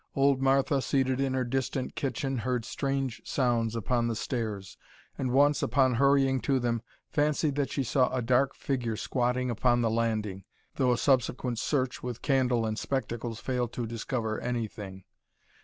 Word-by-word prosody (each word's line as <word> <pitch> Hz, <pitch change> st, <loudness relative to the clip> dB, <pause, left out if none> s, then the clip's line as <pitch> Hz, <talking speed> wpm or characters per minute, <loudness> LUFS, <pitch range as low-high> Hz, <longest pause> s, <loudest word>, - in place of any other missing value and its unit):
Old 135 Hz, -1 st, +3 dB
Martha, 135 Hz, +1 st, +3 dB
seated 130 Hz, -1 st, +1 dB
in 135 Hz, -1 st, 0 dB
her 130 Hz, -, +1 dB
distant 130 Hz, +1 st, -2 dB
kitchen, 135 Hz, -1 st, -2 dB
heard 125 Hz, 0 st, -1 dB
strange 135 Hz, -2 st, -2 dB
sounds 120 Hz, -4 st, 0 dB
upon 120 Hz, +2 st, 0 dB
the 115 Hz, -, -1 dB
stairs, 105 Hz, -5 st, -4 dB, 0.4 s
and 130 Hz, -, -2 dB
once, 145 Hz, +3 st, +4 dB
upon 130 Hz, -2 st, +3 dB
hurrying 135 Hz, +1 st, +3 dB
to 135 Hz, -, +1 dB
them, 120 Hz, -2 st, 0 dB, 0.3 s
fancied 150 Hz, 0 st, +1 dB
that 140 Hz, -1 st, -1 dB
she 140 Hz, -, -1 dB
saw 130 Hz, +1 st, +2 dB
a 130 Hz, -, -1 dB
dark 130 Hz, +3 st, +2 dB
figure 120 Hz, -5 st, -2 dB
squatting 125 Hz, +1 st, 0 dB
upon 120 Hz, +1 st, +2 dB
the 115 Hz, -1 st, +1 dB
landing, 110 Hz, -4 st, -1 dB, 0.3 s
though 130 Hz, -3 st, +3 dB
a 120 Hz, -, +2 dB
subsequent 125 Hz, -2 st, +1 dB
search 130 Hz, -2 st, -1 dB
with 125 Hz, -1 st, -6 dB
candle 130 Hz, -4 st, +2 dB
and 110 Hz, 0 st, -2 dB
spectacles 120 Hz, -4 st, -3 dB
failed 125 Hz, -2 st, -2 dB
to 120 Hz, -, -3 dB
discover 115 Hz, 0 st, -3 dB
anything. 105 Hz, -5 st, -4 dB
125 Hz, 160 wpm, -29 LUFS, 115-135 Hz, 0.4 s, once